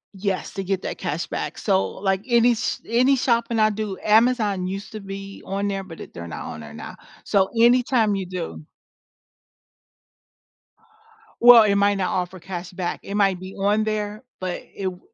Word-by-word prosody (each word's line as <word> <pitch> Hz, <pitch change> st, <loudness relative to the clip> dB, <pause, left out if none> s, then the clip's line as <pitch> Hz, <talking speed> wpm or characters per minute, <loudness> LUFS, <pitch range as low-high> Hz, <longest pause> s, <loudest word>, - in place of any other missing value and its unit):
Yes, 195 Hz, -1 st, -3 dB
to 195 Hz, -, -4 dB
get 190 Hz, 0 st, -2 dB
that -, -, -5 dB
cash 170 Hz, -3 st, -2 dB
back, -, -, -4 dB
so 195 Hz, -2 st, +1 dB
like 195 Hz, -1 st, -1 dB
any 240 Hz, 0 st, +5 dB
s 230 Hz, -, -1 dB
any 250 Hz, +4 st, +4 dB
shopping 235 Hz, -2 st, +1 dB
I 215 Hz, 0 st, +4 dB
do 210 Hz, -2 st, -4 dB
Amazon 215 Hz, -4 st, +3 dB
used 195 Hz, +2 st, -5 dB
to 215 Hz, -, -6 dB
be 195 Hz, 0 st, -8 dB
on 200 Hz, +1 st, -2 dB
there, 195 Hz, -1 st, -2 dB
but 170 Hz, -4 st, -11 dB
it -, -, -10 dB
they're 85 Hz, 0 st, -7 dB
not 85 Hz, -, -6 dB
on 80 Hz, -, -9 dB
there 75 Hz, -1 st, -10 dB
now, -, -, -9 dB, 0.3 s
so 195 Hz, -2 st, +2 dB
anytime 240 Hz, -2 st, +4 dB
you 195 Hz, -2 st, -3 dB
do 175 Hz, -3 st, -6 dB, 2.8 s
Well 240 Hz, -1 st, +10 dB
it 200 Hz, -2 st, +2 dB
might 200 Hz, 0 st, +3 dB
not 185 Hz, -2 st, -1 dB
offer 180 Hz, 0 st, -2 dB
cash 175 Hz, 0 st, -7 dB
back 180 Hz, -1 st, -4 dB
it 200 Hz, -, -5 dB
might 195 Hz, -3 st, +2 dB
be 185 Hz, +1 st, -9 dB
on 205 Hz, +2 st, +1 dB
there, 215 Hz, +1 st, -3 dB, 0.2 s
but 185 Hz, -1 st, -4 dB
it 195 Hz, -, -5 dB
w 180 Hz, -1 st, -3 dB
200 Hz, 180 wpm, -23 LUFS, 185-215 Hz, 2.8 s, Well